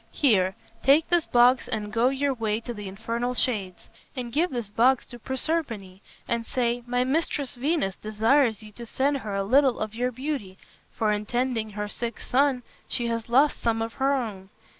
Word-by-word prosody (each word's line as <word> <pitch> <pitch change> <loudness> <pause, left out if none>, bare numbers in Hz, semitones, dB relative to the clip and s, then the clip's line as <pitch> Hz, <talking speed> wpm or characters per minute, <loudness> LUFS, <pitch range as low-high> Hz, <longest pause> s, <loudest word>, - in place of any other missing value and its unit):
Here, 195 -9 +2 0.3
take 285 +4 +4
this 345 -2 +2
box 245 +1 +4
and 215 -3 -3
go 235 +2 +3
your 275 +1 0
way 220 -3 -1
to 240 +1 -6
the 205 -3 -7
infernal 230 +5 -3
shades, 200 -8 -2 0.3
and 245 -3 -5
give 340 +5 +2
this 235 -6 -5
box 245 +4 +3
to 240 - -12
Proserpine 235 - -3 0.3
and 235 0 -1
say, 240 -1 -1
'My 245 +1 +1
mistress 280 0 -1
Venus 260 - -1
desires 220 +2 +2
you 215 - -11
to 235 +2 -10
send 275 +5 +1
her 210 -6 -5
a 195 - 0
little 265 +5 +4
of 215 0 -4
your 250 +2 -1
beauty, 255 -7 -4 0.3
for 215 -1 0
in 210 0 -2
tending 240 -2 -1
her 210 0 -3
sick 235 +2 -5
son 265 -1 +1 0.2
she 240 -2 -1
has 230 0 -3
lost 275 +5 +3
some 230 -1 +1
of 225 0 -3
her 270 +1 +4
own.' 205 -7 -4
240 Hz, 185 wpm, -26 LUFS, 215-265 Hz, 0.3 s, take